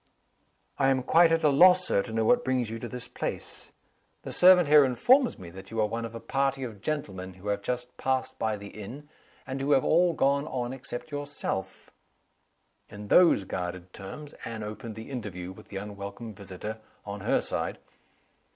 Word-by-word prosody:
"I 135 -1 +4
am 130 -1 +1
quite 165 +5 +5
at 165 0 +2
a 150 - +6
loss, 180 +6 +6
Sir, 100 - +2
to 110 - -7
know 110 0 0
what 245 0 +4
brings 125 -4 0
you 115 - -5
to 120 - -5
this 125 +1 -6
place. - - -6 0.5
The - - -6
servant 180 -2 +7
here 150 0 +8
informs 245 - +3
me 85 -2 -10
that 95 +2 -11
you 115 - -4
are 110 - +4
one 115 +2 -3
of 115 0 -8
a - - -5
party 135 +1 -1
of 110 -6 -7
gentlemen 95 -12 -4
who 95 +3 -7
have 100 0 -1
just 125 +3 -4
passed 130 -1 -1
by 110 -1 0
the 100 0 -9
inn, 125 +9 -9 0.4
and 135 +1 -4
who 145 +2 +2
have 135 - +3
all 175 +1 +4
gone 140 0 +1
on 125 -3 -3
except 135 +1 -7
yourself." 145 -9 -4 1.0
In 105 0 -9
those 170 - +6
guarded 90 -1 -5
terms 140 +10 -9
Anne 115 -2 -5
opened 105 +1 -7
the 110 +5 -9
interview 95 -8 -5
with 95 - -14
the 100 - -7
unwelcome 100 +3 -7
visitor, 100 +2 -7 0.3
on 100 0 -6
her - - +2
side. - - -3
120 Hz, 190 wpm, -28 LUFS, 100-140 Hz, 1.0 s, here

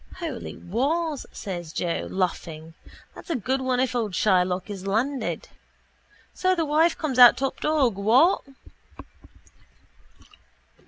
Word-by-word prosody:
—Holy 330 -8 -6
Wars, 285 - -2
says 175 -5 -6
Joe, 170 +1 -2
laughing, 165 -4 -3 0.4
that's - - -13
a 335 - 0
good 260 +3 -1
one 255 -1 0
if 255 -1 0
old 220 -5 -1
Shylock 180 -2 +1
is 195 -2 -7
landed. 250 +7 -2 0.8
So 370 0 +1
the 330 -2 0
wife 315 +3 +2
comes 275 -5 -2
out 245 -1 +9
top 270 0 -2
dog, 275 -9 +1
what? 245 - +4
250 Hz, 120 wpm, -25 LUFS, 190-300 Hz, 0.8 s, out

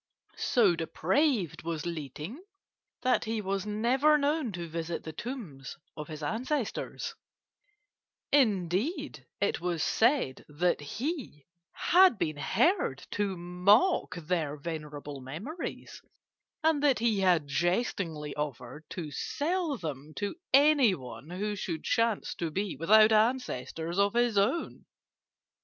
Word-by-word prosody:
So 210 -8 +3
depraved 180 - 0
was 165 -2 -4
Li 160 -5 -4
Ting 195 - -8 0.6
that 255 0 +2
he 225 0 -1
was 195 0 -2
never 255 +8 +3
known 290 -3 0
to 175 -1 -5
visit 165 +1 -4
the 160 - -7
tombs 175 - -7 0.2
of 150 -2 -6
his 155 -1 -7
ancestors; 245 - -2 1.2
indeed, 210 - +1
it - - 0
was 175 -3 -1
said 235 - +2
that 165 +2 0
he 230 - -5 0.5
had 365 - +7
been 155 -5 -2
heard 330 - +1
to 200 -2 -1
mock 180 - +3
their 160 -3 -2
venerable 150 -2 -6
memories, 195 - -7 0.6
and 315 -2 +3
that 285 -3 +4
he 225 -2 +1
had 180 -5 +3
jestingly 170 - -1
offered 150 0 -5
to 160 -5 -5
sell 315 - -1
them 150 - -6
to 205 -1 -2 0.2
anyone 205 - +3
who 205 +4 -3
should 170 -4 -4
chance 230 -2 +1
to 170 - -1
be 195 +3 -2
without 215 +9 +6
ancestors 195 - 0
of 200 +2 +2
his 240 -2 +2
own. 205 +12 0
190 Hz, 120 wpm, -30 LUFS, 155-245 Hz, 1.2 s, had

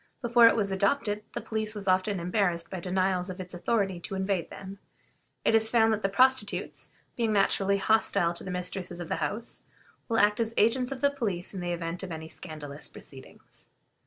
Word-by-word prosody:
Before 240 -1 +6
it - - +4
was 200 -3 +1
adopted 205 +2 0
the - - -4
police 220 -1 -2
was 200 -2 -6
often 185 +1 +2
embarrassed 175 -1 0
by 190 - -4
denials 185 +1 0
of 185 +1 -7
its 185 0 -6
authority 195 0 0
to 195 +3 -5
invade 190 -3 -1
them. 195 0 -9 0.7
It - - +4
is 220 0 +4
found 225 -2 +4
that 215 - -2
the 195 - +1
prostitutes, 255 +1 +1 0.3
being 230 -3 0
naturally 200 -1 +3
hostile 200 -4 +2
to 170 - -9
the - - -6
mistresses 180 0 -4
of 175 - -6
the - - -1
houses, 185 +10 -4 0.5
will 225 - +1
act 210 +1 +4
as 230 0 -1
agents 245 +4 +3
of 270 - -5
the 280 0 +4
police 210 -11 -3
in 190 - -5
the 175 0 -3
event 170 +1 -3
of 190 -2 -6
any 160 0 -6
scandalous 150 -4 -5
proceedings. 135 -1 -12
195 Hz, 195 wpm, -28 LUFS, 180-220 Hz, 0.7 s, Before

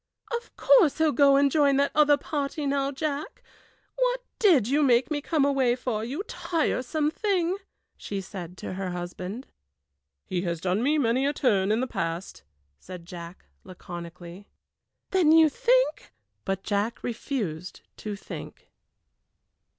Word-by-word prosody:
"Of 470 - -7
course 405 - +5
he'll 315 -1 +3
go 280 +1 +5
and 280 0 +4
join 285 -2 +3
that 280 0 +2
other 295 -1 +5
party 285 +1 -3
now, 275 0 0
Jack! 290 +1 -4 0.5
What - - +1 0.2
did 325 - +5
you 285 +4 +2
make 255 +1 +3
me 290 -1 -1
come 300 -1 +1
away 265 -4 +2
for, 245 -4 -3
you 275 - -4
tiresome 310 - -1
thing!" 375 -3 0 0.4
she 200 - -5
said 185 -2 -8
to - - -6
her 190 0 -4
husband. 180 +6 -6 0.8
"He 180 -1 -2
has 170 -2 -2
done 185 +4 0
me 295 +5 +2
many 260 0 +2
a 290 - 0
turn 205 -8 +2
in 220 +3 +2
the - - +1
past," 170 -6 -4 0.4
said 180 -2 -10
Jack, 170 -1 -10 0.2
laconically. 175 +1 -10 0.6
"Then 360 -5 +4
you 320 -1 +7
think - - +1 0.2
?" 100 -1 -51
But 195 0 -2
Jack 210 +3 -2
refused 210 - -4 0.2
to 210 -1 -5
think. 200 - -10
260 Hz, 150 wpm, -26 LUFS, 190-300 Hz, 0.8 s, you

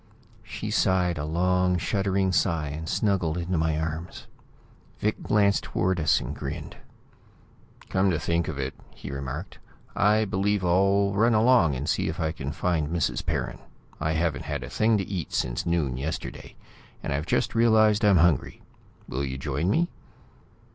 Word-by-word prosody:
She - - -6
sighed, 90 -4 +2
a 75 - -2
long, 90 +3 +1
shuddering 95 +1 0
sigh, 85 -5 +1
and 80 +3 -5
snuggled 90 -6 0
into 90 +1 -2
my 80 -1 +1
arms. 80 +2 -5 0.7
Vic 105 +1 -1
glanced 100 -1 +2
towards 95 -2 0
us 75 -3 +3
and - - -5
grinned. - - -6 1.1
"Come 95 +1 +2
to 85 - +1
think 85 0 0
of 75 - -4
it," 65 -1 -3 0.2
he - - -8
remarked, 70 +6 -6 0.4
"I 110 +1 +3
believe 100 0 0
I'll 100 +3 +3
run 110 +3 +3
along 110 - +4
and 70 +3 -4
see - - 0
if 80 +1 -4
I 80 -1 0
can 70 -3 -5
find 80 -1 -1
Mrs. 85 -3 -1
Perrin. - - -3 0.4
I 80 +1 0
haven't 80 -1 -1
had 70 -3 -3
a 60 - -8
thing 110 0 +2
to 95 - -2
eat 90 -5 -4
since - - -1
noon 75 -7 0
yesterday, 70 +2 -5 0.5
and - - -2
I've 75 +4 -2
just - - 0
realized 110 -2 +4
I'm 100 -3 +5
hungry. 80 -4 +2 0.4
Will 65 +2 -3
you 65 -1 -3
join 70 +5 -1
me?" 165 +11 +2
85 Hz, 165 wpm, -26 LUFS, 75-100 Hz, 1.1 s, I'm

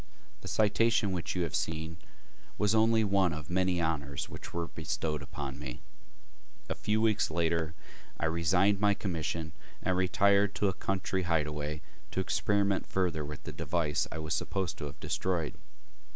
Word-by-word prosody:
The - - -8
citation 110 -1 +3
which 90 0 -2
you 90 - +1
have 85 - -3
seen 80 +2 -2 0.6
was 105 0 +3
only 110 0 +5
one 95 -4 +3
of 75 -2 -6
the - - -4
many 90 -1 +2
honors 70 -4 -1
which - - -8
were 85 -1 -2
bestowed 75 -1 -2
upon 70 -1 -6
me. 65 -5 -7 0.8
A - - -1
few 105 +1 0
weeks 110 -2 +3
later 80 0 0 0.4
I - - +1
resigned 90 +5 +3
my 100 0 +4
commission 85 -4 -2 0.3
and 95 - +2
retired 100 +2 +3
to 105 - +2
a 95 - +1
country 95 0 -1
hideaway 75 -3 -1 0.3
to - - -3
experiment 100 +1 +1
further 90 -5 0
with 75 0 -7
the - - -5
device 80 -4 0
I - - -4
was 80 -1 -2
supposed 95 -3 -2
to 75 - -3
have 70 -1 -8
destroyed. 85 -5 -1
85 Hz, 165 wpm, -31 LUFS, 80-100 Hz, 0.8 s, only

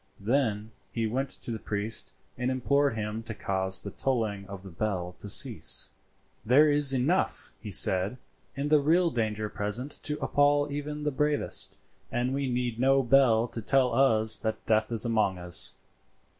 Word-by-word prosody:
Then 110 -1 -1 0.2
he 115 -1 -2
went 130 +5 -2
to - - -3
the 110 - -5
priest 105 +1 -3 0.2
and 125 +1 -3
implored 140 +1 0
him 110 0 -4
to 115 -1 -8
cause 95 -1 -1
the 100 - -7
tolling 110 -7 -3
of 100 -1 -10
the 95 - -11
bell 90 -1 -4
to 105 - -8
cease. - - +3 0.5
"There 135 +7 +4
is 145 -1 +5
enough," 135 +8 -1
he 110 - -8
said, 95 +4 +2 0.4
"in 140 +2 -3
the 155 0 +4
real 165 +4 +2
danger 110 -3 -2
present 105 +7 -3
to 150 0 -3
appal 145 0 +1
even 150 +1 -5
the 150 - -1
bravest, 150 +2 0 0.3
and 120 +2 -2
we 140 -1 -2
need 120 -2 -3
no 135 +1 +3
bell 120 -3 +3
to 115 - -6
tell 130 +2 +1
us 110 -4 +3
that 110 -1 -4
death 110 +1 +1
is 115 0 0
among 110 -5 0
us. 90 0 +4
120 Hz, 170 wpm, -27 LUFS, 105-135 Hz, 0.5 s, is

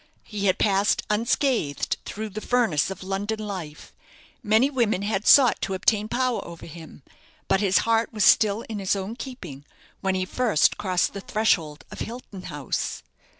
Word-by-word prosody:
He 205 -2 -3
had 185 - +2
passed 200 0 +2
unscathed 230 - 0
through 215 +1 -5
the 210 +2 -7
furnace 225 - +1
of 195 -1 -7
London 200 +3 -2
life; 185 -8 -7 0.5
many 220 +5 +3
women 225 -7 0
had 205 -1 -2
sought 260 -5 +6
to 195 - -2
obtain 210 +3 +1
power 255 +1 -1
over 170 -1 -10
him; 160 -3 -12 0.4
but 195 0 +2
his 195 -2 +3
heart 230 0 +1
was 215 -2 -1
still 210 +2 +4
in 220 -3 -6
his 195 0 0
own 200 +3 -4
keeping 185 - -8 0.4
when 190 -1 -1
he 185 0 -1
first 220 -5 +1
crossed 185 -3 0
the 200 - -6
threshold 170 -9 0
of - - -9
Hilton 230 -5 -7
House. 145 -6 -4
205 Hz, 165 wpm, -24 LUFS, 185-225 Hz, 0.5 s, sought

